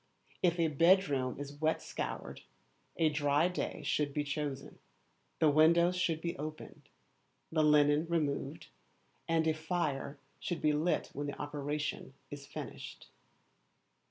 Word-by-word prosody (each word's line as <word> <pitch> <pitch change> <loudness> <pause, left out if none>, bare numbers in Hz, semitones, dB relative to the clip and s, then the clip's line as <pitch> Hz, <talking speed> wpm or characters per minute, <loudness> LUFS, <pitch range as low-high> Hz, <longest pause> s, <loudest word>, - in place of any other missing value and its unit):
If 175 -1 +3
a 165 - +4
bedroom 150 -5 +3
is 145 +1 -8
wet 160 +1 +2
scoured, - - -5 0.6
a 160 -2 +4
dry 145 +1 +2
day 180 - -4
should 145 -2 0
be 150 - +1
chosen 140 -1 -4 0.6
the 155 -2 +4
windows 170 +4 +5
should 165 -3 0
be 170 0 -2
opened, 155 +1 -8 0.6
the 160 -1 +2
linen 150 +1 +4
removed, 155 -4 -1 0.6
and 165 -1 +2
a 160 - +3
fire 155 -3 -2 0.2
should 175 - -3
be 150 -1 +2
lit 155 +4 0
when 145 +1 -3
the 145 - -6
operation 145 -1 -3 0.2
is 140 -1 -8
finished. - - -8
150 Hz, 130 wpm, -33 LUFS, 145-165 Hz, 0.6 s, windows